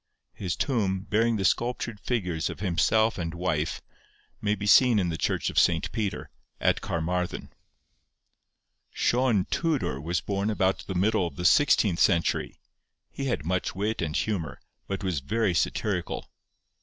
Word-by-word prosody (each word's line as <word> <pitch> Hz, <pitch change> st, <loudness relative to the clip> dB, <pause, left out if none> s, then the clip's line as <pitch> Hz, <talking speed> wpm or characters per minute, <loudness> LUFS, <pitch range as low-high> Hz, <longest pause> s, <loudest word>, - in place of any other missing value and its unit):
His 90 Hz, -5 st, -3 dB
tomb, 100 Hz, -8 st, 0 dB
bearing 115 Hz, +3 st, +1 dB
the 95 Hz, -3 st, -1 dB
sculptured 120 Hz, -1 st, 0 dB
figures 90 Hz, -9 st, -2 dB
of -, -, -7 dB
himself 110 Hz, +4 st, +2 dB
and 85 Hz, -1 st, -3 dB
wife, 85 Hz, -3 st, -1 dB, 0.6 s
may 105 Hz, 0 st, +1 dB
be 105 Hz, -, -5 dB
seen 120 Hz, +2 st, +6 dB
in 90 Hz, -4 st, +1 dB
the 80 Hz, -, -2 dB
church -, -, -1 dB
of -, -, +3 dB
St. -, -, +2 dB
Peter, 105 Hz, -3 st, -3 dB, 0.3 s
at -, -, +2 dB
Carmarthen. 90 Hz, +2 st, -3 dB, 1.4 s
Sion 120 Hz, -6 st, +1 dB
Tudor 150 Hz, -, -1 dB
was 85 Hz, +4 st, -1 dB
born 100 Hz, +1 st, -2 dB
about 95 Hz, -3 st, +1 dB
the 95 Hz, -, -4 dB
middle 100 Hz, 0 st, +2 dB
of -, -, -10 dB
the 90 Hz, -, -5 dB
sixteenth 105 Hz, -, +4 dB
century. 85 Hz, -4 st, +1 dB, 0.5 s
He 140 Hz, -, -5 dB
had 120 Hz, -, -2 dB
much 90 Hz, +1 st, -1 dB
wit 105 Hz, +3 st, -1 dB
and 75 Hz, -2 st, -2 dB
humour, 90 Hz, -9 st, -2 dB, 0.3 s
but 95 Hz, 0 st, -4 dB
was 90 Hz, -6 st, -1 dB
very 100 Hz, +7 st, 0 dB
satirical. 85 Hz, -, -1 dB
95 Hz, 150 wpm, -27 LUFS, 85-110 Hz, 1.4 s, seen